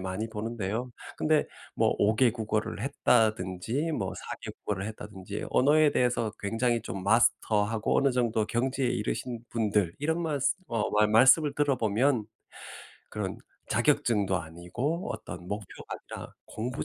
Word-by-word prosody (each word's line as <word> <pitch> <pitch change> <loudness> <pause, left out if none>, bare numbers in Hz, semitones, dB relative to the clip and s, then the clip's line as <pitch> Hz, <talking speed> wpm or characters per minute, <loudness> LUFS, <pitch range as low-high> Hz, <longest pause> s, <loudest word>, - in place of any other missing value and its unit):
많이 95 +4 -3
보는데요. 110 +1 -3 0.3
근데 155 -1 +2 0.3
뭐 - - +3
5 105 +1 +3
개 125 0 +5
국어를 110 -2 -2
했다든지 115 - +1
뭐 - - -2
4 - - -6
개 - - -6
국어를 100 -1 -4
했다든지 105 -2 -7
언어에 150 +3 +5
대해서 120 -4 +1
굉장히 115 +2 0
좀 95 -4 -5
마스터하고 110 0 +2
어느 140 - +3
정도 120 -3 +1
경지에 130 +3 0
이르신 120 +2 -3
분들 105 -6 +1
이런 160 +3 0
말쓰 145 -5 +1
어 115 -3 -1
말 105 0 +4
말씀을 135 +7 +6
들어보면 130 -3 +2 0.8
그런 - - -4 0.3
자격증도 100 -5 +2
아니고 90 - -4
어떤 85 0 -7
목표가 105 +1 -6 0.2
아니라 - - -10
공부 120 +3 -4
115 Hz, 305 characters per minute, -28 LUFS, 105-130 Hz, 0.8 s, 말씀을